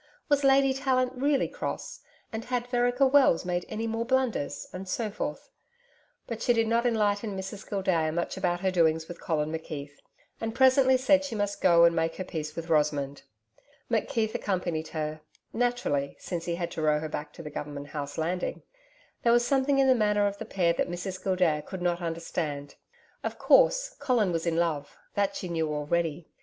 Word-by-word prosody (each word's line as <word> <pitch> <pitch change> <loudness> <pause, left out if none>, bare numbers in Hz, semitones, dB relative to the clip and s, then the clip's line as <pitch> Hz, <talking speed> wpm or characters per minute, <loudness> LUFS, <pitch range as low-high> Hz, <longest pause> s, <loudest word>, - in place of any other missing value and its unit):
Was 290 -1 +3
Lady 270 0 +5
Tallant 260 -2 +1
really 275 +2 +1
cross? - - -5 0.3
and 220 +1 -4
had 245 -1 -1
Vereker 245 +2 +2
Wells 265 -11 +4
made 180 0 -2
any 225 +1 -3
more 225 0 -1
blunders? 240 - -1
and 185 +1 -7
so 215 +2 -1
forth. - - -5 0.7
But 230 -2 -6
she 245 - +3
did 225 -1 +2
not 235 +2 +2
enlighten 210 -2 0
Mrs 190 +2 -7
Gildea 185 -6 +1
much 170 +2 -2
about 175 -1 -1
her 190 -1 +1
doings 160 -2 +2
with 175 - -9
Colin 155 -3 -1
McKeith, 145 -3 -6 0.4
and 225 0 -3
presently 260 0 +5
said 285 +2 +4
she 280 -5 -4
must 205 -1 -2
go 170 -2 +6
and 170 0 +4
make 165 0 0
her 185 - -4
peace 155 -4 -5
with 165 0 -5
Rosamond. 145 -3 +1 0.7
McKeith 225 -1 0
accompanied 175 -5 -2
her 155 -1 -4 0.3
naturally, 240 - 0
since 170 -2 -5
he 170 - -1
had 170 -1 -3
to - - -4
row 150 -1 +3
her 155 - -4
back 150 -1 -5
to 165 - -10
the 150 - -7
Government 145 0 -6
House 145 -1 -5
landing. 175 +3 -2 0.6
There 235 - +3
was 240 0 +4
something 275 +1 +2
in 270 - +5
the 260 - +7
manner 210 -3 +2
of 200 0 -2
the - - -5
pair 175 -3 +1
that - - -1
Mrs 185 +1 -5
Gildea 180 -5 +2
could 190 -2 -6
not 175 0 0
understand. 165 -4 -3 0.5
Of - - -3
course, - - +4
Colin 245 -9 +2
was 165 0 -2
in 165 - +1
love 160 -4 -1 0.2
that 200 -1 0
she 185 - -4
knew 160 -3 -1
already. 155 +2 -1
185 Hz, 190 wpm, -28 LUFS, 160-240 Hz, 0.7 s, the